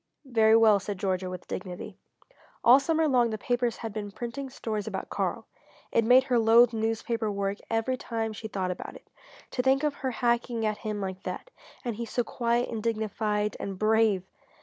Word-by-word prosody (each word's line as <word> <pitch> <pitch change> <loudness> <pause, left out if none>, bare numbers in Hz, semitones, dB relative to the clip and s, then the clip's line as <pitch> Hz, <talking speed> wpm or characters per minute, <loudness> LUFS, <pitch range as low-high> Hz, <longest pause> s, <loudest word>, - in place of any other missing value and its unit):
"Very 225 -3 +5
well," 220 -3 +6
said 200 0 -5
Georgia, 185 -1 -1
with 180 -1 -8
dignity. 180 -1 -6 0.7
All 250 +3 +8
summer 320 +2 +1
long 245 -4 +3
the 215 - -3
papers 245 +1 -1
had 225 -3 -6
been 205 -1 -4
printing 240 +6 -5
stories 215 -5 -4
about - - -5
Karl. - - -2 0.5
It 230 - +3
made 250 +3 +6
her 250 -2 +2
loathe 230 +1 +6
newspaper 225 0 -1
work 200 0 -2
every 225 +3 0
time 225 -2 -3
she 220 +1 -6
thought 190 -3 -2
about 180 - -7
it. - - -14 0.4
To 250 - 0
think 265 +2 +3
of 295 -2 -1
their 265 - 0
hacking 235 -1 0
at 215 -1 -1
him 210 -2 -4
like 190 -1 -4
that - - -6 0.3
and 235 -3 -2
he 235 - -3
so 245 - 0
quiet 235 +1 0
and 225 -2 -4
dignified 215 -1 -1
and 195 -1 -5
brave! 215 -2 +3
225 Hz, 190 wpm, -28 LUFS, 210-240 Hz, 0.7 s, All